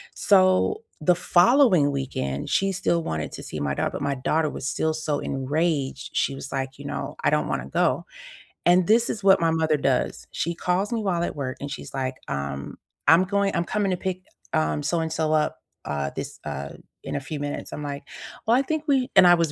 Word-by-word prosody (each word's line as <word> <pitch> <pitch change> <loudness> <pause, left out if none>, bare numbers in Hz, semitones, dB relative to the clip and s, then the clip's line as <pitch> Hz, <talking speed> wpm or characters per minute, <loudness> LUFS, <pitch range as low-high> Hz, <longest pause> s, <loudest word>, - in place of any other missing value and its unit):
So, 190 - +3 0.2
the 180 +4 +4
following 180 - +4
weekend, 125 - -3
she 195 0 +2
still 175 -3 0
wanted 80 - -3
to - - -7
see 75 - -5
my 70 -1 -1
daugh - - -1
but - - -5
my 140 0 0
daughter 155 +4 +1
was 135 - -5
still 160 +1 0
so 155 -2 -2
enraged. 140 0 -1
She 140 - +1
was 135 - -7
like, 135 0 -3
you 140 - -9
know, - - -4
"I - - +6
don't - - +1
wanna 60 - -2
go." - - +1 0.6
And 175 0 +5
this 230 +2 +4
is 210 - -4
what 195 0 +6
my 165 -1 +3
mother 160 -1 +2
does, 135 -3 0
she 170 - -2
calls 180 +5 0
me 230 - 0
while 175 -4 0
at - - -2
work, 130 -3 -4
she's 145 - -7
like, 130 -1 -2
um, 70 0 -4 0.3
"I'm 165 +5 +7
going 200 0 0
I'm 170 - +1
coming 205 +1 0
to 180 - 0
pick, 185 0 -4 0.3
um, 75 -1 +1
so-and-so 160 -2 0
up, 155 -1 0 0.2
uh, 70 -1 -2
this, - - -6
uh, 70 +1 -5 0.3
in - - -4
a - - 0
few 150 +2 -5
minutes." 145 0 -4
I'm - - -5
like, 140 -1 -5 0.4
"Well, 230 - +4
I - - +4
think 310 +2 -2
we" 265 -3 +2
and 190 - +8
I 175 - +8
was 165 -3 0
160 Hz, 210 wpm, -25 LUFS, 135-185 Hz, 0.6 s, and